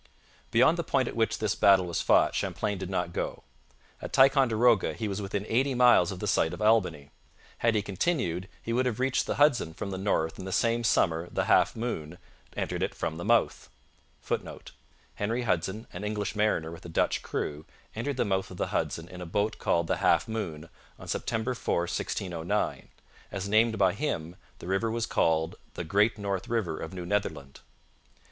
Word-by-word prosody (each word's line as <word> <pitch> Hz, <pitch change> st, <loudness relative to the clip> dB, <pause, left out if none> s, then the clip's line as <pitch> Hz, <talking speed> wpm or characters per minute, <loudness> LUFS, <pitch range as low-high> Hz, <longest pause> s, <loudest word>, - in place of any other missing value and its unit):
Beyond 160 Hz, +9 st, +4 dB
the -, -, 0 dB
point 135 Hz, -5 st, +1 dB
at -, -, -5 dB
which 115 Hz, -1 st, +1 dB
this 110 Hz, -2 st, 0 dB
battle 95 Hz, -3 st, +5 dB
was 85 Hz, -2 st, -2 dB
fought -, -, +4 dB
Champlain 100 Hz, -2 st, -2 dB
did 95 Hz, -1 st, -5 dB
not 90 Hz, -2 st, -2 dB
go. -, -, -3 dB, 0.6 s
At -, -, -6 dB
Ticonderoga 125 Hz, -5 st, +4 dB
he 110 Hz, -, -3 dB
was 100 Hz, 0 st, -3 dB
within 100 Hz, +1 st, -3 dB
eighty 130 Hz, +3 st, +1 dB
miles 120 Hz, -8 st, +5 dB
of 95 Hz, -, -6 dB
the 105 Hz, -, -3 dB
site 80 Hz, -5 st, +2 dB
of -, -, -7 dB
Albany. 90 Hz, -10 st, +2 dB, 0.5 s
Had 115 Hz, -1 st, +2 dB
he 105 Hz, -, +1 dB
continued, 100 Hz, -, -1 dB
he 115 Hz, -, -2 dB
would 130 Hz, +2 st, +2 dB
have 120 Hz, -2 st, -2 dB
reached 130 Hz, 0 st, +1 dB
the -, -, -1 dB
Hudson 130 Hz, -, +3 dB
from 100 Hz, -, -5 dB
the 95 Hz, -, -4 dB
north 80 Hz, -5 st, 0 dB
in 95 Hz, -, -6 dB
the 95 Hz, -, -5 dB
same 115 Hz, +4 st, +1 dB
summer 85 Hz, -5 st, +2 dB
the -, -, -1 dB
Half -, -, +4 dB
Moon 90 Hz, -9 st, -4 dB, 0.3 s
[Footnote: 80 Hz, +2 st, -3 dB, 0.4 s
Henry 115 Hz, +4 st, -2 dB
Hudson, 95 Hz, +2 st, -1 dB
an 90 Hz, -, -6 dB
English 105 Hz, 0 st, -2 dB
mariner 105 Hz, -7 st, +1 dB
with 85 Hz, -, -10 dB
a 85 Hz, -, -8 dB
Dutch 80 Hz, -, +1 dB
crew, 75 Hz, +1 st, -4 dB, 0.3 s
entered 130 Hz, +4 st, -3 dB
the -, -, +1 dB
mouth 95 Hz, -1 st, -1 dB
of 95 Hz, -, -10 dB
the -, -, -2 dB
Hudson 85 Hz, 0 st, -2 dB
in 90 Hz, 0 st, -10 dB
a 90 Hz, -, -6 dB
boat 105 Hz, +5 st, -1 dB
called 85 Hz, 0 st, +1 dB
the -, -, 0 dB
Half -, -, +3 dB
Moon 85 Hz, -8 st, -5 dB, 0.3 s
on -, -, -11 dB
September 115 Hz, +3 st, -2 dB
4, 115 Hz, -, -1 dB
1609. 85 Hz, -1 st, -2 dB, 0.4 s
As 95 Hz, 0 st, -4 dB
named 110 Hz, +2 st, +3 dB
by 95 Hz, -2 st, +3 dB
him, 90 Hz, -, -3 dB, 0.2 s
the -, -, -11 dB
river 95 Hz, +5 st, 0 dB
was 115 Hz, 0 st, -1 dB
called 80 Hz, -3 st, +1 dB, 0.2 s
the -, -, -3 dB
'Great 105 Hz, +6 st, +2 dB
North 100 Hz, -2 st, -3 dB
River 110 Hz, -9 st, -1 dB
of 80 Hz, -, -6 dB
New 90 Hz, -2 st, -6 dB
Netherland.' 85 Hz, -8 st, -3 dB
100 Hz, 180 wpm, -28 LUFS, 85-115 Hz, 0.6 s, battle